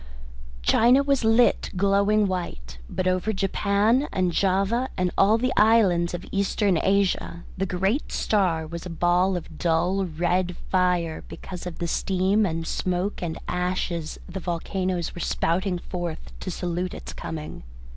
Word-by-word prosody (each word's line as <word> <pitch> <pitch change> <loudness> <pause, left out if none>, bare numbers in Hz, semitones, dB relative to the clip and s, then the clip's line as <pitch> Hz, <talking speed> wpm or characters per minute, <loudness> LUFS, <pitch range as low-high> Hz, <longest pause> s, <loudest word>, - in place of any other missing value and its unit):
China 245 - +5
was 275 -3 +1
lit 225 +2 +3
glowing 200 +2 +3
white, 60 - -4
but 185 - -2
over 185 +3 +1
Japan 205 +6 +1
and 185 -2 +1
Java 200 +8 +1
and 180 -1 +1
all 210 +3 +4
the 250 +2 0
islands 195 -6 +4
of 175 - -7
Eastern 195 -2 +1
Asia 195 -3 0
the 195 +1 -1
great 195 - -1
star 180 -7 +1
was 170 +1 -7
a 180 - -7
ball 175 +2 +2
of 160 -2 -9
dull 175 +3 +1
red 175 +2 0 0.2
fire 180 -3 +1
because 180 -1 -8
of 175 - -7
the 175 - -3
steam 190 +4 +1
and 165 -1 -3
smoke 185 +4 -2
and 170 -2 -3
ashes 180 -2 -2
the 185 +2 -6
volcanoes 180 0 -2
were 175 - -7
spouting 180 +4 0
forth 175 -2 -6
to - - -5
salute 180 0 -3
its - - -8
coming. 155 -1 -6
185 Hz, 145 wpm, -25 LUFS, 175-200 Hz, 0.2 s, China